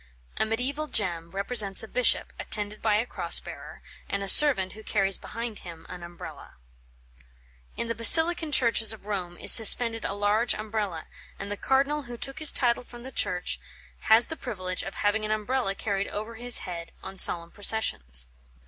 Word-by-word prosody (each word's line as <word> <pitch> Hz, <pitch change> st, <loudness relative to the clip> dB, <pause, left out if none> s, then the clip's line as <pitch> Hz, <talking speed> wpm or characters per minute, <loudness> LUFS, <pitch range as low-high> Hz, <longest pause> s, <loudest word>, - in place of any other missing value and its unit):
A -, -, +1 dB
mediæval 265 Hz, +7 st, -4 dB
gem 170 Hz, -5 st, -2 dB
represents 200 Hz, +1 st, -1 dB
a -, -, -9 dB
bishop, -, -, 0 dB
attended 210 Hz, 0 st, -3 dB
by 215 Hz, -2 st, 0 dB
a 220 Hz, +3 st, -1 dB
cross -, -, 0 dB
bearer, -, -, -12 dB, 0.3 s
and 200 Hz, 0 st, -4 dB
a -, -, -6 dB
servant 195 Hz, -5 st, +7 dB
who 220 Hz, -, -13 dB
carries 195 Hz, -3 st, -1 dB
behind 230 Hz, -2 st, -8 dB
him 165 Hz, -2 st, -13 dB
an 180 Hz, -1 st, -10 dB
Umbrella. 175 Hz, 0 st, -12 dB, 1.2 s
In 235 Hz, -, -5 dB
the 230 Hz, -, -3 dB
Basilican 320 Hz, +8 st, +5 dB
churches 230 Hz, -5 st, +2 dB
of 215 Hz, -, -15 dB
Rome 180 Hz, -4 st, -6 dB
is -, -, +5 dB
suspended 225 Hz, 0 st, +7 dB
a -, -, -4 dB
large 205 Hz, +3 st, -1 dB
Umbrella, 210 Hz, -6 st, -6 dB, 0.3 s
and 200 Hz, +1 st, -9 dB
the -, -, -3 dB
cardinal 275 Hz, +6 st, -1 dB
who 240 Hz, -3 st, -10 dB
took 270 Hz, +3 st, -7 dB
his 310 Hz, -2 st, +5 dB
title 240 Hz, -2 st, -1 dB
from 240 Hz, -1 st, -14 dB
the 265 Hz, -, -10 dB
church 180 Hz, -7 st, -2 dB, 0.5 s
has 225 Hz, +2 st, +6 dB
the 320 Hz, -, -8 dB
privilege 185 Hz, -10 st, -6 dB
of 195 Hz, -, -9 dB
having 205 Hz, +1 st, -2 dB
an 215 Hz, -, -5 dB
Umbrella 215 Hz, -1 st, -3 dB
carried 200 Hz, -1 st, -4 dB
over 215 Hz, +3 st, -7 dB
his 245 Hz, +1 st, -1 dB
head 170 Hz, -2 st, -9 dB
on 190 Hz, -, -11 dB
solemn 170 Hz, -1 st, +4 dB
processions. 65 Hz, -, 0 dB
215 Hz, 175 wpm, -25 LUFS, 195-240 Hz, 1.2 s, servant